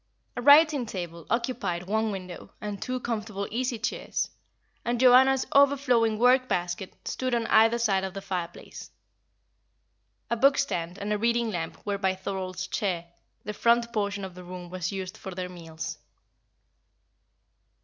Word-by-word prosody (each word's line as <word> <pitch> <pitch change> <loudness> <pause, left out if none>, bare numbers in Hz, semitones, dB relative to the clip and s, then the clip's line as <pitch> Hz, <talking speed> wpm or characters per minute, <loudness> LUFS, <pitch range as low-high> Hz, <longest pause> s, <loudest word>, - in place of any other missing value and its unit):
A - - -3
writing 290 -1 +6
table 175 -4 -6
occupied 230 -8 -1
one 220 +3 0
window, 185 -2 -7
and 205 -1 -5
two 255 0 -2
comfortable 215 -4 -3
easy 245 +1 -1
chairs, 220 - -2 0.5
and 240 0 -1
Joanna's 260 +1 +6
overflowing 265 -6 +4
work 255 +2 +4
basket, 180 0 -2
stood 255 -1 -1
on 230 -1 0
either 225 +1 +5
side 200 -5 +1
of 190 0 -5
the 195 - -4
fireplace. 180 -3 -6 1.4
A - - +3
book 275 +4 +4
stand 175 -10 -2
and 205 +1 -2
a 210 - -1
reading 235 0 +1
lamp 165 -4 -5
were 200 -1 -1
by 190 -1 +1
Thorold's 190 -1 -4
chair; 175 -4 -2 0.3
the 210 - -5
front 235 +2 +2
portion 200 -2 -1
of 185 - -9
the 180 0 -11
room 180 -1 -9
was 180 -1 -3
used 190 -2 -5
for 190 -2 -7
their 180 0 -4
meals. 165 -3 -7
205 Hz, 150 wpm, -27 LUFS, 185-240 Hz, 1.4 s, writing